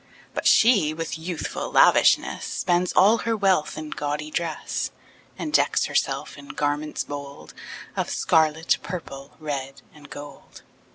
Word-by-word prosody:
But - - -1
she, 200 -10 +5
with 165 0 -4
youthful 165 0 -4
lavishness, - - +4
Spends 180 0 0
all 210 +5 +5
her 230 -1 -1
wealth 190 -6 +1
in 155 -1 -6
gaudy 150 +1 -3
dress, 165 -1 -2 0.5
And 305 - -5
decks - - +3
herself - - -2
in 285 - -12
garments 150 - -2
bold 140 - -8 0.4
Of - - -2
scarlet, 160 0 +2
purple, 140 -6 -8
red, 140 -3 -5
and 150 -1 -15
gold. 145 -1 -11
155 Hz, 130 wpm, -24 LUFS, 145-180 Hz, 0.5 s, she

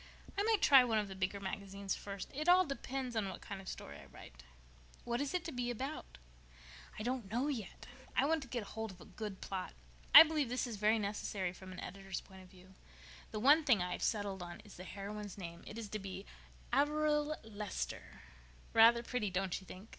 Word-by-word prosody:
_" - - -18 0.3
"I 400 - +1
might 435 -1 +2
try 270 -3 +9
one 230 -3 +1
of 210 -2 0
the - - -5
bigger 190 +1 -1
magazines 195 0 -4
first. 200 -1 -6
It 305 +5 0
all 365 +1 +7
depends 270 -3 -4
on 210 -3 0
what - - -7
kind 200 -1 -7
of 190 - -14
a - - -2
story 70 0 -7
I 70 - -12
write." - - -13 0.6
"What 240 +2 -1
is 285 +5 -2
it 360 - -1
to 330 - -3
be 245 -3 -2
about?" 255 - -5 0.8
"I 215 - -4
don't 245 -4 -2
know 245 +7 0
yet. 230 -9 -5 0.3
I 270 - +4
want 320 +1 +2
to 270 - -8
get 240 -2 -2
hold 220 +2 -5
of 185 -2 -12
a - - -12
good 210 -3 -7
plot. 185 -2 -4 0.4
I 320 - +15
believe 305 -5 0
this 250 +2 0
is 235 -4 -5
very 215 +2 +3
necessary 200 -3 -2
from 185 0 -11
an 185 - -8
editor's 195 +1 -5
point 190 -1 -14
of 185 - -15
view. 185 0 -17 0.6
The 215 - -4
only 290 +6 +7
thing 250 - +4
I've 180 - -3
settled 205 -3 -1
on 175 -1 -7
is 210 - -14
the 185 - -9
heroine's 205 +1 -6
name. 170 -3 -7
It 215 - -7
is 225 -2 -5
to 215 - -3
be 195 0 -7 0.5
Averil 300 +2 +2
Lester. 210 -2 -5 0.5
Rather 230 +1 +7
pretty, 235 -4 -1
don't 190 0 -1
you 190 - -16
think? 195 +5 -10
215 Hz, 220 wpm, -35 LUFS, 190-260 Hz, 0.8 s, I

